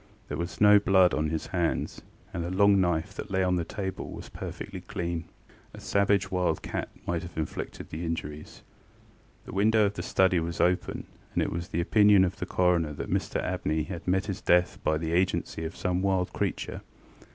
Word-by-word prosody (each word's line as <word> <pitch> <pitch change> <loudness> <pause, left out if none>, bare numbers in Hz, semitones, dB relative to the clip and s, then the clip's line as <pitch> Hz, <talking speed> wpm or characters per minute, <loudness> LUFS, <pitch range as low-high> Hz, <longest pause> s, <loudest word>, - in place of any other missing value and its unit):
There 75 - -3
was 85 +1 -4
no 105 0 +8
blood 95 -3 +4
on 75 0 0
his 80 0 -2
hands, 85 -3 -1 0.3
and 85 -3 -2
a 85 - -3
long 100 +1 +4
knife 90 +1 0
that 105 - -7
lay 95 -1 +1
on 90 0 +2
the 85 - 0
table 95 +2 -5
was - - -8
perfectly - - -7
clean. 85 -1 -4 0.5
A - - -10
savage 100 -1 +1
wild 90 -1 0
cat - - -3 0.2
might 85 -1 -1
have 85 -1 -10
inflicted 80 - -5
the 80 +2 -4
injuries. 75 -2 -5 0.8
The - - -9
window 105 +2 +4
of 100 - 0
the - - -5
study 95 -2 +3
was 85 +1 -4
open, 90 0 +1 0.3
and - - +3
it - - -2
was 85 +1 -4
the 85 - -1
opinion 105 +1 +5
of 95 +2 -3
the - - -3
coroner 85 -4 +2
that - - -6
Mr - - -1
Abney 80 +1 -1
had 85 0 -7
met 95 +1 +2
his 100 0 -4
death 90 0 +3
by 80 - +2
the 80 +1 -3
agency 90 -2 0
of 80 - -6
some 90 0 0
wild 95 -2 0
creature. - - -3
90 Hz, 195 wpm, -28 LUFS, 85-95 Hz, 0.8 s, no